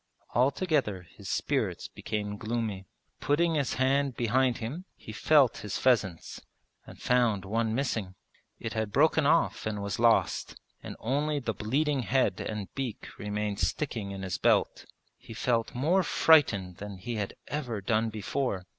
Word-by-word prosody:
Altogether 130 - +1
his 85 - -11
spirits - - -1
became 105 -1 -4
gloomy. 110 -4 -3 0.3
Putting 165 +3 +2
his 140 -7 0
hand 135 +1 +1
behind 125 +2 +2
him 135 +11 -5
he - - -10
felt 140 +3 +4
his 105 -2 -4
pheasants, 105 -9 +1 0.5
and - - -12
found 120 -6 +2
one 110 +2 0
missing. 110 -8 -2 0.4
It - - -5
had 110 -2 -2
broken 155 +3 +3
off 165 -7 +2
and 105 -1 -2
was 100 0 -3
lost, 115 -1 +2 0.2
and - - -7
only 145 +5 0
the 120 -5 -2
bleeding 140 +8 0
head 130 +2 +1
and 105 -3 -5
beak 130 -5 -5
remained 105 0 -2
sticking 110 +2 -1
in 95 -1 -6
his 95 - -3
belt. - - +2 0.3
He 115 - -11
felt 115 +2 0
more 165 +10 +3
frightened 110 - +3
than 105 -1 -7
he 115 +5 -5
had 100 -2 -3
ever 125 -8 -3
done 110 +3 +1
before. 110 -2 -2
115 Hz, 150 wpm, -29 LUFS, 105-135 Hz, 0.5 s, felt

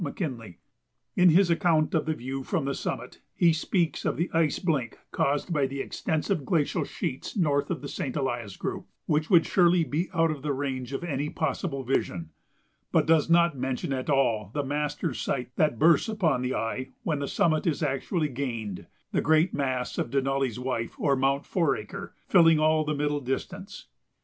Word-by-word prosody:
McKinley." 130 - -5 0.6
In 180 0 +6
his 175 +2 +5
account 165 -2 +2
of 155 -1 +1
the 155 - 0
view 135 +2 -5
from 160 0 -1
the 140 - -1
summit - - -5
he 170 -2 +4
speaks 165 +1 0
of - - -1
"the 170 +2 -1
ice 165 -2 +2
blink 145 - -1
caused 145 +5 0
by 140 -3 +2
the 135 +1 -6
extensive 160 +4 -1
glacial 150 +1 0
sheets 135 - -5
north 145 -6 +1
of 175 - -2
the 140 - -6
Saint 130 -2 -4
Elias 120 -8 -3
group," - - -4 0.2
which 155 0 0
would 170 -4 +6
surely 175 -2 +4
be 155 +5 -2
out 165 -2 +2
of 150 -3 -5
the 145 0 -1
range 130 -2 -3
of 140 - -4
any 150 -3 -2
possible 140 -2 -2
vision, 90 -10 -2 0.6
but - - +3
does 160 -1 +3
not 170 -2 +4
mention 130 +1 -2
at 130 +1 -3
all 115 -8 +2
the 145 - 0
master 145 +2 -2
sight 125 0 -3
that 150 -7 +2
bursts 165 - +4
upon 180 - +1
the 125 0 -1
eye 130 +3 -3
when 155 -3 -1
the 140 - -2
summit 155 +2 +1
is 160 0 0
actually 150 +3 0
gained 120 -8 -4 0.2
the - - +1
great 160 +3 +3
mass 130 -3 -2
of - - -1
"Denali's 135 -2 0
Wife," 125 -3 -3
or 140 -2 +2
Mount 135 +1 +1
Foraker, 170 - -2
filling 165 -4 +6
all 155 0 +3
the 150 0 -2
middle 145 0 0
distance. 190 - -5
145 Hz, 185 wpm, -27 LUFS, 130-165 Hz, 0.6 s, In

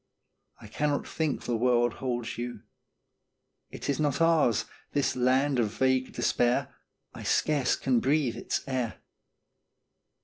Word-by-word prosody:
I 115 - -13
cannot 145 +7 -1
think 155 -3 -2
the 120 - -1
world 120 0 +2
holds 120 -3 -2
you; 120 -2 -5 1.1
It - - -7
is 140 0 0
not 145 -2 +1
ours, 165 -9 +3 0.3
this 145 -1 +1
Land 130 +2 +2
of 110 -3 0
Vague 130 0 +1
Despair 120 0 +1 0.4
I - - -9
scarce 145 -5 +1
can 130 -3 +1
breathe 135 -1 +1
its - - -3
air. 130 -4 -2
130 Hz, 130 wpm, -28 LUFS, 120-140 Hz, 1.1 s, ours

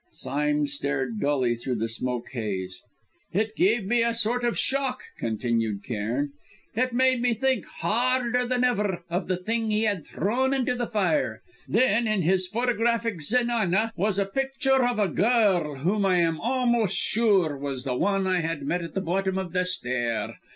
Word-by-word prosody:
Sime 150 +1 -1
stared 135 -4 -2
dully 130 -4 +1
through 125 +2 -3
the 115 0 -1
smoke 120 +1 -4
haze. 95 -7 -4 0.5
"It 215 +3 0
gave 315 - +2
me 235 +4 +2
a 230 0 +1
sort 235 +2 +1
of 240 -1 0
shock," 265 -1 0 0.2
continued 115 -2 -1
Cairn. 120 +7 -2 0.4
"It 255 +3 0
made 255 0 +3
me 245 -1 +2
think, 260 -3 0
harder 245 +5 0
than 250 0 +1
ever, 205 -7 0
of 180 +2 -1
the 185 -1 0
thing 225 +4 -2
he 215 +1 +1
had 205 -7 0
thrown 260 +7 0
in 260 -2 0
the 245 -1 -1
fire. 220 +7 0 0.2
Then, 230 -1 +2
in 215 -4 +1
his 185 +2 +2
photographic 230 -3 0
zenana, 225 +1 +1
was 200 +1 0
a 200 - +2
picture 270 +4 +1
of 245 -1 +1
a 205 -2 +2
girl 190 - +2
whom 185 +10 0
I 185 -2 +3
am 165 -2 +1
almost 240 -5 +1
sure 200 -9 +3
was 135 -2 -4
the 135 -2 -2
one 195 +6 +1
I 185 -1 +2
had 165 -3 -3
met 175 +6 -1
at 170 - -8
the 195 - 0
bottom 190 +1 -1
of 185 -2 -4
the 180 -1 +1
stair. 120 -9 -2
195 Hz, 175 wpm, -26 LUFS, 150-235 Hz, 0.5 s, made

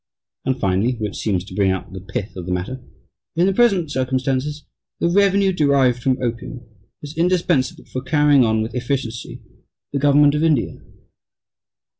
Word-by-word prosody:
And, 130 0 0
finally 100 +5 +1
(which 110 -4 -4
seems 95 -5 -1
to 105 - -11
bring 100 -2 +2
out 95 -1 -3
the 95 - -7
pith 100 +2 -5
of 90 -2 -7
the - - -3
matter), 100 +9 -3 0.5
"In 170 +2 +3
the 195 - +2
present 190 -8 +2
circumstances 130 +2 -1 0.3
the - - +1
revenue 195 +1 +3
derived 140 -6 +2
from 130 0 +1
opium 120 +1 -4 0.4
is 145 +2 -8
indispensable 175 -4 +1
for 130 - -5
carrying 145 -1 +4
on 110 -1 +1
with 110 - -6
efficiency 125 -2 -4 0.5
the 140 - 0
government 145 +1 +5
of 150 +1 0
India." 155 -7 +1
130 Hz, 160 wpm, -20 LUFS, 115-150 Hz, 0.5 s, government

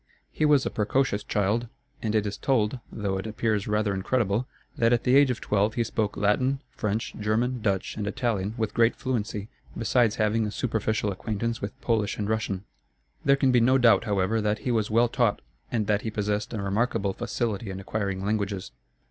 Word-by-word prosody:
He 155 - 0
was 145 -3 +4
a - - -1
precocious 105 -1 0
child, 105 +4 0 0.3
and 110 -1 -1
it 105 -1 +2
is 100 0 -3
told 125 -2 +1
(though 100 -3 -2
it 100 - -5
appears 110 -1 -1
rather 105 -1 +1
incredible) 110 +3 0 0.3
that 115 0 +3
at 120 - +1
the 125 +1 +4
age 140 -1 +6
of 125 - -1
twelve 105 +1 +1
he 120 - +2
spoke 110 -2 -2
Latin, 125 +7 +2
French, 105 +2 -2
German, 115 +4 0
Dutch, 100 -3 -1
and 105 -1 -2
Italian 105 -2 -1
with 110 -2 -1
great 115 0 +3
fluency, 105 -5 -3 0.3
besides 115 0 +2
having 110 0 +1
a - - -4
superficial 110 -3 -1
acquaintance 110 +4 -3
with 100 0 -5
Polish 110 -4 0
and 105 - -2
Russian. 105 -3 -1 0.6
There 140 - +5
can 135 -1 +2
be 125 - +5
no 130 +3 +5
doubt, 120 -2 +5
however, 105 +1 +1
that 105 0 +1
he 125 - +1
was 110 -3 +1
well 115 +2 +4
taught, 120 -3 +1 0.3
and 110 -3 0
that 105 0 +1
he 115 - -3
possessed 105 0 -2
a 110 - -3
remarkable 100 0 0
facility 115 -2 -2
in 95 0 -5
acquiring 100 -1 -3
languages. 100 -2 -2
110 Hz, 190 wpm, -26 LUFS, 105-120 Hz, 0.6 s, age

